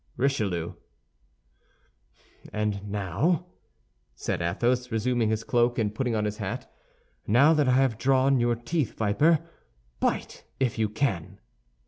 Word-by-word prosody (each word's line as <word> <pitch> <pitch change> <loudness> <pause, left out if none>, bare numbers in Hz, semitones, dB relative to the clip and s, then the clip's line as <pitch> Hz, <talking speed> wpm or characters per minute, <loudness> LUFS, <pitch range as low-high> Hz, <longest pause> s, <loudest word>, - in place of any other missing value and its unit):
"RICHELIEU" 105 -11 0 1.8
"And 105 -1 -2
now," 105 - 0 0.7
said - - -3
Athos, 120 +8 0
resuming 115 0 +1
his 110 0 -1
cloak 120 0 +2
and 105 -3 0
putting 120 0 -1
on 105 -1 0
his 105 0 -3
hat, - - -5 0.5
"now 135 +9 +6
that 150 -3 +2
I 125 - +4
have 130 -4 +2
drawn 135 0 +3
your 120 0 +2
teeth, 125 +2 -2
viper, 150 +10 +2 0.5
bite - - -2 0.2
if 125 -4 0
you 110 -1 +1
can." 95 - -2
120 Hz, 125 wpm, -27 LUFS, 105-135 Hz, 1.8 s, now